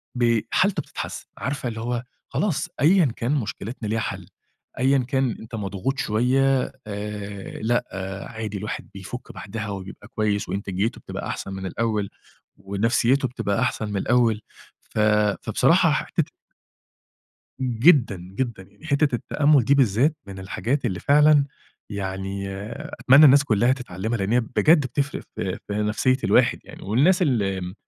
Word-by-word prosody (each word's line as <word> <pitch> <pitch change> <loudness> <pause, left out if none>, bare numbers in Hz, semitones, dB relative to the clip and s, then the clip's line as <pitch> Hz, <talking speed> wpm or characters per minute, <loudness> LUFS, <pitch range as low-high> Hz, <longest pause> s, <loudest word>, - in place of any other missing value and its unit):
بي 115 -3 +2
حالته 190 -4 +2
بتتحسّن، - - -6
عارفة 135 -1 -3
اللي 110 -1 -6
هو، 120 +1 -2 0.3
خلاص، 195 -9 -1
أيًا 170 +3 +5
كان 120 0 -2
مشكلتنا 115 -2 -4
ليها 110 +2 0
حَل، - - -4 0.5
أيًا 135 +2 +4
كان 130 -1 0
أنت 115 +1 -8
مضغوط 105 +6 -3
شوية 130 +4 +2 0.2
آآ، 105 -1 -6
لأ 120 +2 +1 0.5
عادي، 110 -3 -5
الواحد 105 +2 -5
بيفُك 100 +6 -8
بَعدها 110 +2 -6
وبيبقى 100 0 -8
كويس 105 -2 -1
وإنتاجيته 100 +2 -2
بتبقى - - -6
أحسن 95 - -5
من 95 0 -5
الأول 105 0 -1 0.5
ونفسيته 115 +7 +1
بتبقى 105 -4 -2
أحسن 110 -4 -1
من 105 - -2
الأول، 115 0 +2 0.5
ف - - -3 0.4
فبصراحة - - +3
ح - - +1
حِتّة - - -1 1.3
جدًا، 125 - +4
جدًا 95 +4 -4
يعني. 100 +11 -16
حِتّة 145 -2 +2
التأمُّل 145 +2 +3
دي 140 +4 +4
بالذات 135 +4 +3
من 95 -1 -8
الحاجات 120 +8 -2
اللي 90 -1 -1
فعلًا 150 0 +5 0.5
يعني 95 -1 -4 0.6
أتمنى 140 +4 +7
الناس 140 0 +7
كلّها 120 0 +3
تتعلّمها، 115 -3 -3
لإن 100 +2 -1
هي 125 - +4
بجد 150 +7 +3
بتفرِق 140 +3 -2
في - - -3
في - - -3
نفسية 105 +5 +1
الواحد - - +4
يعني - - -12
والناس 145 - +3
اللي 100 - +1
م 90 +1 -6
115 Hz, 145 wpm, -24 LUFS, 100-135 Hz, 1.3 s, أتمنى